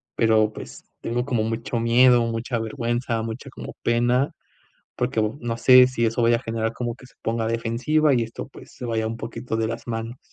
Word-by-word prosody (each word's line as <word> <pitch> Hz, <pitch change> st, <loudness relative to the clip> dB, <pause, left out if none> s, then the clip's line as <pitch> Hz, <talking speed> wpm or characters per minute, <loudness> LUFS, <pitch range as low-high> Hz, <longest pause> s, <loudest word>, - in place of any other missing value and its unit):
pero 110 Hz, -2 st, +3 dB
pues -, -, -10 dB, 0.2 s
tengo 120 Hz, +2 st, -2 dB
como 120 Hz, -5 st, 0 dB
mucho 115 Hz, +1 st, -2 dB
miedo, 120 Hz, +1 st, +5 dB
mucha 115 Hz, +1 st, -2 dB
vergüenza, 120 Hz, 0 st, -2 dB
mucha 115 Hz, +5 st, -6 dB
como -, -, -8 dB
pena, 120 Hz, +3 st, +2 dB, 0.6 s
porque 125 Hz, -2 st, -1 dB
bo 110 Hz, +6 st, -2 dB
no 115 Hz, -1 st, -3 dB
sé 125 Hz, +1 st, +7 dB
si 120 Hz, -2 st, 0 dB
eso 115 Hz, +2 st, 0 dB
vaya 115 Hz, 0 st, +4 dB
a -, -, -9 dB
generar 115 Hz, 0 st, -2 dB
como 120 Hz, -1 st, -3 dB
que 125 Hz, -, -15 dB
se -, -, -25 dB
ponga 115 Hz, 0 st, -1 dB
defensiva, 125 Hz, +7 st, +1 dB
y 120 Hz, -2 st, +2 dB
esto 115 Hz, +3 st, -7 dB
pues -, -, -14 dB
se 125 Hz, -, -7 dB
vaya 110 Hz, -1 st, -1 dB
un 115 Hz, +1 st, -4 dB
poquito 115 Hz, +1 st, -5 dB
de 110 Hz, 0 st, 0 dB
las 115 Hz, +1 st, -6 dB
manos. 115 Hz, +2 st, -4 dB
115 Hz, 205 wpm, -24 LUFS, 115-125 Hz, 0.6 s, sé